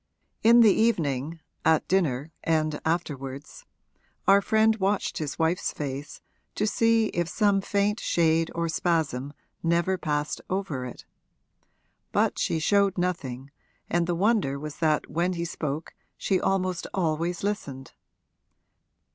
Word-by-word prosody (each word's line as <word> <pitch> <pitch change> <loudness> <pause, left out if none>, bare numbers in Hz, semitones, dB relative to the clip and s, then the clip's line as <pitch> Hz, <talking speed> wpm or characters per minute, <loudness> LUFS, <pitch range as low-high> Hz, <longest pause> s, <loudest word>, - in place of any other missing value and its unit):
In 235 +1 +7
the 215 -4 +7
evening, 160 - 0 0.2
at 160 -1 +3
dinner 155 -6 0
and 155 -2 0
afterwards, 150 - -4 0.6
our 200 +1 +6
friend 220 +1 +3
watched 200 0 0
his 150 -2 -4
wife's 165 +2 0
face 140 0 -6 0.3
to 210 - 0
see 225 0 +2
if 175 -1 -2
some 200 0 +2
faint 205 +2 0
shade 165 -1 +2
or 170 0 0
spasm 160 -5 -1 0.3
never 170 +3 +1
passed 150 -2 -2
over 185 -9 -2
it. 125 - -11 1.1
But - - +1
she - - 0
showed 200 +4 +2
nothing, 140 -7 -3 0.4
and 170 0 +1
the 175 - 0
wonder 190 -7 +1
was 150 +1 -7
that 155 -2 +1
when 175 +4 0
he 170 -1 -3
spoke 155 -2 -4 0.2
she 190 -2 +1
almost 185 -2 0
always 170 0 -1
listened. 140 - -4
170 Hz, 130 wpm, -26 LUFS, 150-195 Hz, 1.1 s, In